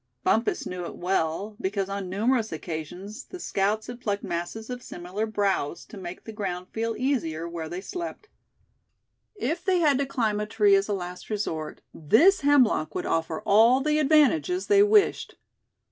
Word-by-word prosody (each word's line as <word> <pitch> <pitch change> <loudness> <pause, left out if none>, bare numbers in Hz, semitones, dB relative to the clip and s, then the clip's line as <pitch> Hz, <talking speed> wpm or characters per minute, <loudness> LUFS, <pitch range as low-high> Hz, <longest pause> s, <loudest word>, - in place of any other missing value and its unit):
Bumpus 225 +2 +1
knew 180 -1 -5
it - - -7
well, 185 +3 -1
because 195 0 -1
on 195 -1 -4
numerous 220 +4 +1
occasions 170 +6 -6
the 365 - -10
scouts 210 - 0
had 245 0 -8
plucked 205 -3 -2
masses 175 +7 -4
of 250 0 -5
similar 185 +2 -5
"browse," 200 -8 -1
to - - -13
make 180 -2 -8
the 220 - -9
ground 185 -4 -4
feel 225 0 -2
easier 170 - -1
where 165 -2 -5
they 180 +2 -5
slept. 355 - -6 1.1
If 330 - -2
they 375 -1 +2
had 295 -6 +3
to 280 - 0
climb 220 -6 0
a 210 - -2
tree 210 -1 +3
as 195 0 +3
a 210 - -1
last 180 -2 -6
resort, 165 -8 -3
this 295 - +4
hemlock 270 - +3
would - - -2
offer 160 -1 -1
all 230 +5 +6
the 300 +2 +1
advantages 310 +4 +3
they 405 -1 +5
wished. 415 0 +3
210 Hz, 170 wpm, -26 LUFS, 180-265 Hz, 1.1 s, all